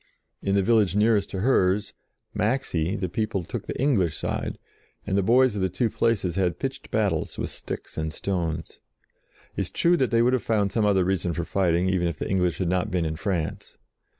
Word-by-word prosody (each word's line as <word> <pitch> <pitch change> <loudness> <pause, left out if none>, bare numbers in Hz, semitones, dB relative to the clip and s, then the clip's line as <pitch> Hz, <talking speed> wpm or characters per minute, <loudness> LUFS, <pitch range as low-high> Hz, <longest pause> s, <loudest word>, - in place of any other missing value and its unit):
In 100 - 0
the 100 - +3
village 105 -4 +3
nearest 105 -1 +3
to 95 - -4
hers, 100 -4 +2 0.4
Maxey, 105 -7 0
the 95 -3 -2
people 100 0 -2
took - - -6
the - - -5
English 100 - +2
side, - - -3 0.5
and 95 - -1
the 100 - +3
boys 120 +3 +4
of 100 - -2
the 95 - +1
two 105 +5 0
places 100 -6 +1
had 90 -2 0
pitched - - -5
battles - - 0
with - - -3
sticks - - -6
and 80 0 -2
stones. 85 -3 -3 0.7
It - - -1
is - - -3
true 175 +1 +3
that 130 -4 +1
they 115 0 +3
would 125 +2 +3
have 130 - +2
found 105 -3 +1
some 110 -2 +2
other 95 -3 +3
reason 90 -2 0
for 85 - -2
fighting, 90 -1 +1
even 95 -2 +1
if 85 -3 -3
the - - -3
English 90 -4 +1
had 95 - -1
not 90 +1 0
been 90 -2 0
in 80 0 -2
France. 85 -2 -3
95 Hz, 205 wpm, -25 LUFS, 90-110 Hz, 0.7 s, boys